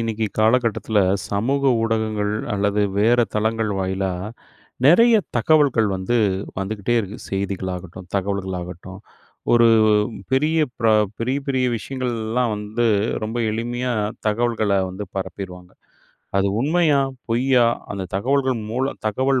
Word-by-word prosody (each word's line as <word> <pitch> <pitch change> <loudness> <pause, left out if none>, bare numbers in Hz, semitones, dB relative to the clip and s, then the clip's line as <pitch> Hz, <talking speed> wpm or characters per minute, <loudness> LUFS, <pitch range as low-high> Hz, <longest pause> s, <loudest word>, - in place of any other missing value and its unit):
இன்னைக்கு 115 -1 -1
காலகட்டத்துல, 110 -1 +2 0.3
சமூக 125 +8 0 0.2
ஊடகங்கள் 110 -2 0 0.2
அல்லது 100 +1 +1 0.2
வேற 120 +4 +4 0.2
தளங்கள் 110 0 0
வாயிலா 95 0 -1 0.7
நிறைய 230 +9 +6 0.2
தகவல்கள் 135 -4 +3
வந்து, 95 +6 -1 0.4
வந்துக்கிட்டே 100 +3 -2
இருக்கு. 100 +1 -7
செய்திகளாகட்டும், 95 -2 -4
தகவல்கள் 95 -1 -2
ஆகட்டும், 90 +2 -9 0.5
ஒரு 120 -1 +6 0.6
பெரிய 155 +5 +2 0.2
பர 115 - 0 0.3
பெரிய 130 +4 -1
பெரிய 130 -2 +1
விஷயங்கள்லாம் 120 -1 -2
வந்து, 105 +3 -1 0.4
ரொம்ப 110 +2 -4
எளிமையா 120 +3 -2 0.3
தகவல்கள 110 -1 0 0.2
வந்து 95 +3 -6
பரப்பிருவாங்க. 90 -2 -6 0.7
அது 100 0 +2
உண்மையா? 155 +1 +3 0.3
பொய்யா? 125 +1 +3 0.3
அந்த 100 -1 -4
தகவல்கள் 130 +3 +1
மூலம் 130 +4 -2
தகவல் 130 +5 +1
110 Hz, 110 wpm, -21 LUFS, 100-125 Hz, 0.7 s, நிறைய